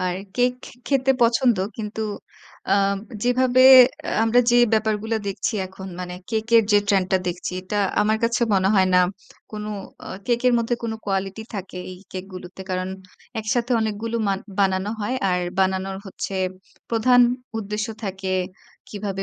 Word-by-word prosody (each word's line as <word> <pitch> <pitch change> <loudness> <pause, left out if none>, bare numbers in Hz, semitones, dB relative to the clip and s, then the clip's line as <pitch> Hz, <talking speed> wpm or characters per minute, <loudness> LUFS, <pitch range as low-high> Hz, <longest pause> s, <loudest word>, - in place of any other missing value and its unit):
আর 185 0 -1 0.2
cake 245 0 +2
খে - - -11
খেতে 270 -1 +2
পছন্দ, 235 0 +3 0.2
কিন্তু 215 0 -5 0.7
আ - - +5 0.5
যেভাবে 255 +1 +3 0.6
আমরা 225 +2 +4
যে 240 - +4 0.2
ব্যাপারগুলা 220 0 +1
দেখছি 195 0 -2
এখন, 190 +1 -10
মানে 180 0 -5 0.2
কেকের 225 +1 +3
যে 205 - +7
ট্রেন্ডটা 190 -2 +2
দেখছি, 175 0 -3
এটা 190 +3 -5 0.2
আমার 215 +1 +2
কাছে 235 0 +1
মনে 190 0 +3
হয় 190 -1 +4
না - - +7 0.5
কোনো 210 0 -5 0.4
আ - - -10 0.2
কেকের 245 +1 +2
মধ্যে 235 +1 0
কোনো 230 -1 -2
কোয়ালিটি 195 +2 -2
থাকে। 195 -2 -6
এই 180 - -10
কেক 185 0 -5
গুলিতে 185 +1 -9
কারণ 185 0 -2 0.5
একসাথে 235 +3 -1
অনেকগুলো 220 +1 -2
মা 195 - +2 0.2
বানানো 190 0 +1
হয়, 210 +5 -1 0.2
আর 180 0 +1 0.2
বানানোর 190 0 0
হচ্ছে 195 +1 -5 0.6
প্রধান 245 +2 +4 0.4
উদ্দেশ্য 210 0 -3 0.2
থাকে 190 -1 -4 0.6
কীভাবে 200 -2 -4
210 Hz, 145 wpm, -23 LUFS, 190-230 Hz, 0.7 s, যে